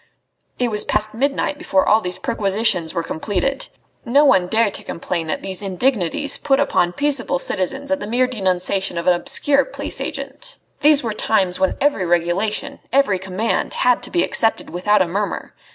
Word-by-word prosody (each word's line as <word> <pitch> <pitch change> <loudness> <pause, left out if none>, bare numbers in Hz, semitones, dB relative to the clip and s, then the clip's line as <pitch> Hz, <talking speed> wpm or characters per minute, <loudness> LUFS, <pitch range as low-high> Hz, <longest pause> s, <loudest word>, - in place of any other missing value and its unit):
It 245 -2 0
was 210 -1 +2
past 215 0 -2
midnight 280 +4 -1
before 195 - +1
all 220 +1 +4
these 180 -2 0
perquisitions 195 -4 +1
were 170 -2 -3
completed. 205 +12 -2 0.4
No 280 +5 +3
one 190 -10 +4
dared 220 +1 +1
to - - -4
complain 165 -1 -4
at - - -3
these 190 -1 -2
indignities 210 - 0
put 270 -1 +1
upon 175 -11 +1
peaceable 280 -8 0
citizens 270 +12 -1
on 285 - +1
the 205 - -6
mere 245 +3 +2
denunciation 190 -5 0
of 170 - -3
an 180 - +5
obscure 275 +7 +2
police - - -3
agent. - - -6 0.2
These 295 -1 +5
were 225 -2 -2
times 195 -4 0
when 190 0 0
every 280 -11 +1
regulation, 195 +10 -1
every 260 -9 +2
command, 190 +4 -2
had 250 -1 +2
to - - -5
be 345 - +1
accepted 225 - +1
without 200 +3 +2
a - - -5
murmur. 200 +4 -4
210 Hz, 175 wpm, -19 LUFS, 185-270 Hz, 0.4 s, an